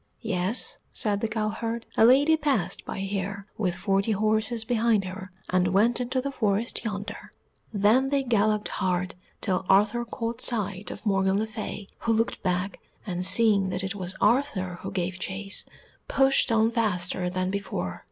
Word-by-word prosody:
"Yes," 210 Hz, -, -1 dB
said 205 Hz, -2 st, -1 dB
the 225 Hz, -, +1 dB
cowherd, 220 Hz, +1 st, -3 dB
"a 220 Hz, -, +6 dB
lady 280 Hz, +6 st, +6 dB
passed 290 Hz, -, -1 dB
by -, -, -5 dB
here, 195 Hz, 0 st, -3 dB
with 185 Hz, -5 st, -1 dB
forty 195 Hz, +3 st, +1 dB
horses 220 Hz, +2 st, 0 dB
behind 225 Hz, -4 st, +2 dB
her, 185 Hz, 0 st, -7 dB, 0.2 s
and 180 Hz, 0 st, +3 dB
went 220 Hz, +7 st, +2 dB
into 255 Hz, +2 st, -1 dB
the 280 Hz, +2 st, -3 dB
forest 220 Hz, -2 st, 0 dB
yonder." 205 Hz, -1 st, -5 dB, 0.4 s
Then 220 Hz, +6 st, +3 dB
they 280 Hz, -1 st, +1 dB
galloped 215 Hz, -3 st, +1 dB
hard 180 Hz, 0 st, -1 dB, 0.3 s
till 190 Hz, -2 st, 0 dB
Arthur 210 Hz, +5 st, +4 dB
caught 230 Hz, 0 st, -4 dB
sight 205 Hz, -5 st, 0 dB
of -, -, -9 dB
Morgan 195 Hz, -1 st, +2 dB
le 215 Hz, -, 0 dB
Fay, 215 Hz, -2 st, -6 dB
who 230 Hz, -, +1 dB
looked 225 Hz, +1 st, 0 dB
back, 185 Hz, +1 st, -1 dB, 0.3 s
and, 180 Hz, -3 st, -3 dB
seeing 200 Hz, 0 st, +5 dB
that 185 Hz, +1 st, -3 dB
it 190 Hz, 0 st, -2 dB
was 185 Hz, -2 st, -5 dB
Arthur 205 Hz, -9 st, +1 dB
who -, -, -5 dB
gave 185 Hz, 0 st, -3 dB
chase, 195 Hz, +1 st, -2 dB, 0.4 s
pushed 270 Hz, -2 st, +3 dB
on 225 Hz, 0 st, +3 dB
faster 185 Hz, -5 st, 0 dB
than 185 Hz, +1 st, -2 dB
before. 90 Hz, -, -4 dB
205 Hz, 160 wpm, -26 LUFS, 190-230 Hz, 0.4 s, a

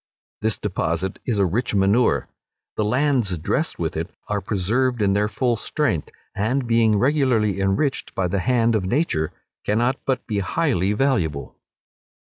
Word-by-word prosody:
This 110 Hz, 0 st, 0 dB
deposit 90 Hz, -2 st, -2 dB
is 115 Hz, -4 st, +1 dB
a 100 Hz, -, +3 dB
rich 105 Hz, +5 st, -1 dB
manure. 100 Hz, +5 st, +3 dB, 0.5 s
The 110 Hz, -, 0 dB
lands 125 Hz, -4 st, +1 dB
dressed 80 Hz, -, -1 dB
with -, -, -2 dB
it -, -, -3 dB, 0.2 s
are 105 Hz, -1 st, -1 dB
preserved 115 Hz, +7 st, 0 dB
in 100 Hz, -2 st, +2 dB
their 105 Hz, +1 st, +2 dB
full 120 Hz, +3 st, 0 dB
strength, 105 Hz, -, -1 dB, 0.2 s
and 120 Hz, +6 st, 0 dB
being 115 Hz, -2 st, +3 dB
regularly 125 Hz, -6 st, +2 dB
enriched 95 Hz, +9 st, 0 dB
by 95 Hz, -, 0 dB
the 95 Hz, +2 st, -1 dB
hand 115 Hz, +2 st, +2 dB
of 110 Hz, -4 st, +1 dB
nature, 95 Hz, -, 0 dB, 0.3 s
cannot 120 Hz, +5 st, +1 dB
but 130 Hz, -2 st, 0 dB
be 105 Hz, -3 st, -1 dB
highly 100 Hz, -, 0 dB
valuable. 105 Hz, -, 0 dB
105 Hz, 150 wpm, -22 LUFS, 95-125 Hz, 0.5 s, a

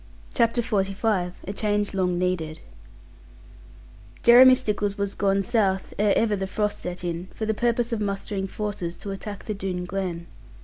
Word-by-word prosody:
CHAPTER 235 Hz, 0 st, +2 dB
XLV 195 Hz, -3 st, 0 dB
A 200 Hz, -, -3 dB
CHANGE 205 Hz, -1 st, 0 dB
LONG 180 Hz, -2 st, 0 dB
NEEDED 170 Hz, -3 st, -1 dB, 1.6 s
Jeremy 255 Hz, +2 st, +9 dB
Stickles 205 Hz, -5 st, -1 dB
was 200 Hz, -1 st, -2 dB
gone 195 Hz, 0 st, +1 dB
south, 195 Hz, -4 st, 0 dB
ere 205 Hz, -1 st, +4 dB
ever 220 Hz, -2 st, +2 dB
the 190 Hz, -1 st, -3 dB
frost 210 Hz, +1 st, -1 dB
set 180 Hz, 0 st, -6 dB
in, 175 Hz, +1 st, -3 dB
for 220 Hz, -, -3 dB
the 220 Hz, -, +1 dB
purpose 235 Hz, +1 st, 0 dB
of 220 Hz, -, -1 dB
mustering 200 Hz, -1 st, -2 dB
forces 195 Hz, -4 st, -4 dB
to 200 Hz, -, -6 dB
attack 205 Hz, +1 st, -7 dB
the 215 Hz, -, -3 dB
Doone 185 Hz, -3 st, -3 dB
Glen. 180 Hz, -2 st, -3 dB
200 Hz, 160 wpm, -25 LUFS, 185-215 Hz, 1.6 s, Jeremy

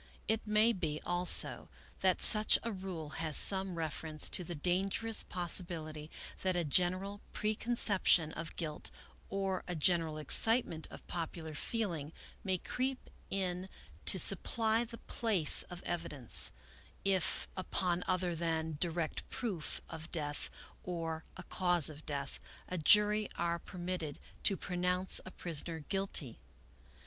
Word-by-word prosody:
It 220 Hz, 0 st, -1 dB
may 215 Hz, +2 st, +3 dB
be, 155 Hz, -6 st, -3 dB
also, 175 Hz, 0 st, 0 dB, 0.3 s
that 185 Hz, -2 st, +1 dB
such 215 Hz, 0 st, +3 dB
a 230 Hz, -, -3 dB
rule 185 Hz, -6 st, -7 dB
has 155 Hz, -3 st, +4 dB
some 190 Hz, -2 st, +7 dB
refer 160 Hz, -1 st, -4 dB
ence 155 Hz, -1 st, -1 dB
to 180 Hz, -, 0 dB
the 175 Hz, 0 st, -6 dB
dangerous 195 Hz, +7 st, 0 dB
possibility 165 Hz, -4 st, -1 dB, 0.3 s
that 185 Hz, -1 st, 0 dB
a 175 Hz, -, 0 dB
general 185 Hz, +6 st, 0 dB
preconcep 215 Hz, -1 st, 0 dB
tion 160 Hz, -3 st, +5 dB
of 165 Hz, 0 st, -7 dB
guilt, 155 Hz, -3 st, -3 dB, 0.4 s
or 195 Hz, -1 st, -2 dB
a 180 Hz, -, -4 dB
general 160 Hz, -1 st, +1 dB
excitement 165 Hz, -, +5 dB
of -, -, -12 dB
popular 165 Hz, -2 st, -6 dB
feeling, 165 Hz, -4 st, -3 dB, 0.3 s
may 190 Hz, -2 st, 0 dB
creep 255 Hz, +8 st, -4 dB, 0.2 s
in 185 Hz, -1 st, -3 dB, 0.4 s
to -, -, +8 dB
supply 225 Hz, 0 st, +3 dB
the 230 Hz, 0 st, -9 dB
place 210 Hz, -12 st, +6 dB
of 180 Hz, -1 st, -9 dB
evidence, 150 Hz, -8 st, 0 dB, 0.5 s
if, 190 Hz, -4 st, +1 dB
upon 180 Hz, -1 st, -1 dB
other 185 Hz, -1 st, -1 dB
than 160 Hz, -2 st, -3 dB
direct 170 Hz, -2 st, -3 dB
proof 195 Hz, -11 st, -3 dB
of 160 Hz, 0 st, -9 dB
death 145 Hz, -3 st, -3 dB, 0.3 s
or 165 Hz, -3 st, -5 dB
a 185 Hz, -, -8 dB
cause 175 Hz, -5 st, +1 dB
of 150 Hz, +1 st, -14 dB
death, 140 Hz, -2 st, -4 dB, 0.3 s
a 185 Hz, -, -5 dB
jury 210 Hz, +5 st, +4 dB
are 170 Hz, 0 st, -1 dB
permitted 175 Hz, -5 st, -6 dB, 0.3 s
to 195 Hz, -, +3 dB
pronounce 180 Hz, +1 st, +1 dB
a -, -, -6 dB
prisoner 165 Hz, -2 st, -3 dB
guilty. 180 Hz, -, -1 dB
175 Hz, 135 wpm, -33 LUFS, 160-195 Hz, 0.5 s, to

